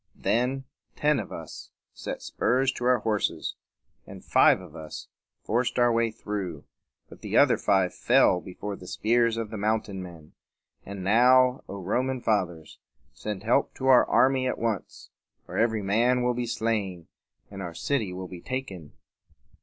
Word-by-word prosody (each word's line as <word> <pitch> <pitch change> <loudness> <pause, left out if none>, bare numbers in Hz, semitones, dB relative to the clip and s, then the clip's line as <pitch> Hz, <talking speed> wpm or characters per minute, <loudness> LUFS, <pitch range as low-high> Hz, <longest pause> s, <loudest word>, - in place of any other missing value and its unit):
Then 125 +3 0 0.3
ten 150 -2 +2
of 105 - -6
us 80 -2 -9 0.2
set - - -6
spurs 130 +2 +1
to 120 - -5
our 125 0 +4
horses; 105 -2 -1 0.5
and - - -11
five - - +5
of - - -13
us 80 -1 -8 0.4
forced 120 +2 0
our 120 -1 +4
way 115 0 +2
through, 100 -8 -5 0.4
but - - -15
the - - -1
other - - +6
five 95 -2 +1
fell 90 - +3
before 100 +2 -6
the 90 - -12
spears 115 +2 +1
of 115 -2 -4
the 110 - -5
mountain 105 -2 -1
men. 85 -4 -11 0.5
And 100 -1 -6
now, 125 +5 +4
O 100 - -6
Roman 130 +7 -1
Fathers! 90 -9 -2 0.3
send 105 -2 -6
help 120 +5 +1
to 130 - -5
our 130 -2 +6
army 130 0 +3
at - - -2
once, 115 -4 -4 0.4
or - - -4
every 110 -2 +1
man 120 +5 +2
will 125 0 +2
be 120 0 -3
slain, 105 -7 -2 0.4
and 100 -1 -7
our 85 -3 -6
city 115 - -1
will 90 0 -6
be 90 -2 -10
taken." 100 - -6
110 Hz, 160 wpm, -27 LUFS, 95-125 Hz, 0.5 s, other